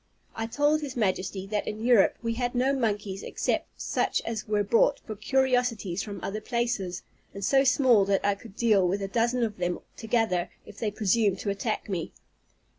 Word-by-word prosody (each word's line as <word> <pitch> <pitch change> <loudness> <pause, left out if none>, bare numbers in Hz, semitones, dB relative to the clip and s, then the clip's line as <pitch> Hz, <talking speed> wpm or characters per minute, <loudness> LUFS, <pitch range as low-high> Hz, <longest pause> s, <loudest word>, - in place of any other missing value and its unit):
I 225 0 -3
told 290 +5 +2
his 275 -4 -6
Majesty, 190 -2 -1
that 205 +1 -2
in 215 +2 -4
Europe 240 -5 +5
we 230 0 0
had 245 +1 -2
no 260 +3 +2
monkeys 205 -6 -1
except - - -2
such - - 0
as 225 -1 -4
were 210 -1 +1
brought 225 +3 +3
for 215 - -7
curiosities 245 -5 +1
from 205 -2 -6
other 215 +2 -3
places, 215 -6 -2 0.3
and 200 -1 -3
so 270 +4 +4
small 255 -5 +5
that 195 0 +1
I 205 - +3
could 200 0 -13
deal 210 -6 +3
with 195 +3 -1
a - - -2
dozen 235 +4 +1
of 215 -3 -2
them 175 -1 -1 0.2
together, 220 -6 0 0.2
if 205 - -12
they 220 - 0
presumed 205 -1 +1
to 200 - -1
attack 210 +2 -3
me. 180 -5 -3
215 Hz, 190 wpm, -27 LUFS, 195-240 Hz, 0.3 s, Europe